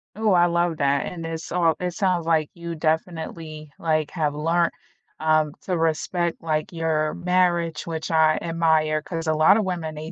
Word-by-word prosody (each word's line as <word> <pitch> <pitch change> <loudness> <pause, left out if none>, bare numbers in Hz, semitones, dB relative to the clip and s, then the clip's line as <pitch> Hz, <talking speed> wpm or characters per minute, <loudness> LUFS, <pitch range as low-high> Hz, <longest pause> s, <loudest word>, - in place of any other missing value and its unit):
Oh, 215 -1 +1
I 175 -1 +5
love 170 -1 0
that 140 0 +1
and 170 -2 -6
it's 165 0 -6
all 170 -2 +2
it 180 -1 -2
sounds 180 -2 0
like 160 -2 +2
you 170 0 -6
definitely, 160 -1 -3
like, 155 -2 0
have 150 -4 -1
learned, 165 +3 +1 0.5
um, 155 -1 +2
to 180 -2 -1
respect, 165 +2 -1
like, 155 +2 -1
your 160 -2 0
marriage, 175 -3 +1
which 160 -1 -4
I 160 -1 +4
admire, 160 -2 +1
'cause 165 -2 -5
a 155 - +3
lot 155 +6 +5
of 215 - 0
women 170 -4 -3
they 155 +2 -7
165 Hz, 180 wpm, -23 LUFS, 155-175 Hz, 0.5 s, I